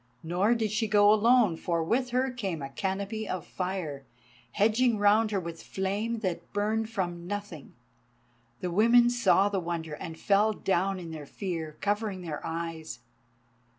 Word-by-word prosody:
Nor 185 +8 +2
did 220 -3 -1
she 220 +1 0
go 205 0 +6
alone, 220 -3 +4
for 170 0 -1
with 250 +9 0
her 255 +2 +1
came 195 - -4
a 135 - -6
canopy 200 +6 -3
of 180 -4 -3
fire, 180 -7 -4 0.5
hedging 225 +4 +3
her - - -5
round 210 +2 +4
with 170 -5 -3
flame 205 +4 -2
that 170 -4 -3
burned 215 +2 0
from 175 -5 -3
nothing. 205 -7 -6 0.9
The 180 - -2
women 235 +5 +5
saw 205 -4 +4
the 200 -1 -1
wonder 165 -3 -4
and 160 +1 -7
fell 205 +5 +3
down 195 -1 0
in 170 -2 -7
their 150 -3 -8
fear, 165 -5 -5
covering 205 -2 -1
their 160 -4 -5
eyes. 160 -6 -5
195 Hz, 155 wpm, -28 LUFS, 170-215 Hz, 0.9 s, go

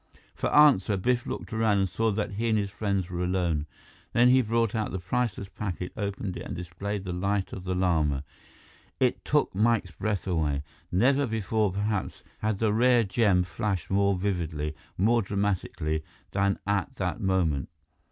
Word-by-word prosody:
For - - -2
answer, 110 -10 +5
Biff 120 +5 0
looked - - -5
around 110 -2 +2
and 95 -1 +2
saw 115 +5 0
that 105 0 -1
he 115 +4 -1
and 110 - +3
his 100 -1 -1
friends 100 -3 -1
were 90 0 -3
alone. 85 -4 0 0.5
Then 120 +1 +5
he 130 +1 +6
brought 115 -1 +1
out 110 -2 -1
the - - -2
priceless 100 +2 -2
packet, 95 -2 -5
opened 100 -2 -3
it, - - -6
and - - -5
displayed 90 +4 -4
the 90 -2 -4
Light 100 +2 -1
of 95 - -7
the 90 0 -1
Lama. 80 -6 +1 0.8
It - - +1
took - - +1
Mike's 105 -2 +2
breath 100 +3 -2
away. 75 -6 0 0.3
Never 130 +9 +3
before, 110 -2 0
perhaps, 100 +1 -2 0.2
had 110 -1 0
the 110 0 +1
rare 120 +1 +4
gem 95 -2 +3
flashed 95 +2 -3
more 100 0 +3
vividly, 80 -6 -2 0.2
more 115 +5 +3
dramatically, 95 -6 -1 0.3
than 100 0 +1
at 100 -3 -1
that - - -2
moment. 85 -8 +1
100 Hz, 170 wpm, -27 LUFS, 90-110 Hz, 0.8 s, he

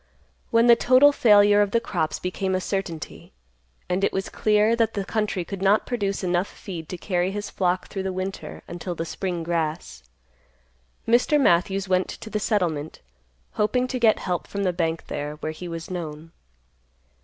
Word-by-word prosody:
When 230 0 +4
the 240 -1 +8
total 255 +5 +6
failure 205 -5 +5
of 205 - +2
the 230 - +2
crops 155 -8 -2
became 190 +1 -2
a - - +1
certainty, 185 -5 -5 0.5
and 180 +2 -1
it - - +3
was 190 - -3
clear 215 +1 +2
that 230 -1 0
the 200 -2 -2
country 210 -4 -1
could 195 0 -6
not 200 +2 +3
produce 200 -6 -2
enough 180 +1 +1
feed 170 -5 -8
to 180 - -5
carry 180 0 -1
his 205 +1 -5
flock 180 -1 0
through 195 - -5
the 190 0 -2
winter 185 +1 -5
until 175 +1 -5
the 165 - -3
spring 175 -1 -3
grass, 165 -1 -3 1.1
Mr. 245 +6 +4
Matthews 190 -3 +2
went 185 0 +2
to 220 - -8
the 210 - -1
settlement 170 -8 -1 0.5
hoping 230 +5 +1
to 255 - -2
get 225 -2 +4
help 180 -2 -3
from 200 0 -3
the 180 -2 +1
bank 165 -1 -2
there, 150 +1 -4
where 155 +1 -4
he 175 +3 -8
was 165 +1 -6
known. 160 -2 -6
190 Hz, 180 wpm, -24 LUFS, 175-210 Hz, 1.1 s, the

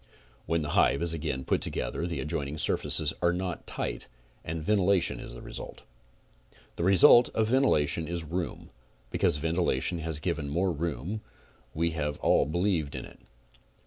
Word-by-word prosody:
When 85 -1 0
the 75 - -4
hive 70 +1 +3
is 85 -1 +2
again 75 -5 -3
put - - +1
together 80 +8 -2
the 85 - -3
adjoin 75 -2 -3
ing 75 +2 -6
surfaces 80 0 +1
are 85 - +3
not 90 -1 -4
tight - - -4 0.4
and 80 0 -4
ventilation 100 -1 +2
is - - -8
the - - -10
result. - - -8 0.9
The - - -3
result 120 +6 +7
of 110 -1 +1
ventilation 85 - +2
is 85 -1 -3
room. 85 -1 -4 0.4
Because 85 -6 +2
ventilation 80 0 0
has 80 -2 -2
given 70 0 -2
more 90 +5 +1
room 85 - -3 0.5
we 85 +1 +1
have 75 -2 -2
all - - +3
believed 85 -3 0
in - - -5
it. - - -15
85 Hz, 160 wpm, -28 LUFS, 75-90 Hz, 0.9 s, result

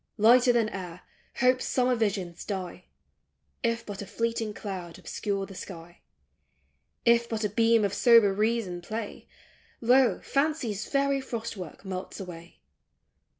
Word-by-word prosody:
Lighter 240 +3 +6
than 230 -3 +2
air. 180 -3 -7 0.4
hope's 255 +1 +3
summer 250 0 +2
visions 200 -7 -2
die, 185 -3 -5 0.8
If 230 -1 -1
but 205 -1 -6
a 200 - -7
fleeting 230 -1 -2
cloud 185 -5 -6
obscure 200 -2 -3
the 195 - -11
sky; 175 -2 -10 1.0
If 235 0 +4
but 225 -1 -2
a 210 - +1
beam 225 +1 +3
of 200 - -1
sober 230 -5 +6
reason 210 -4 0
play, 215 +4 -6 0.5
Lo, 250 +2 +4
fancy's 275 -8 -1
fairy 275 -1 +1
frost 230 -3 -5
work 185 0 -9
melts 185 +1 -6
away! 175 -3 -10
215 Hz, 135 wpm, -28 LUFS, 190-235 Hz, 1.0 s, Lighter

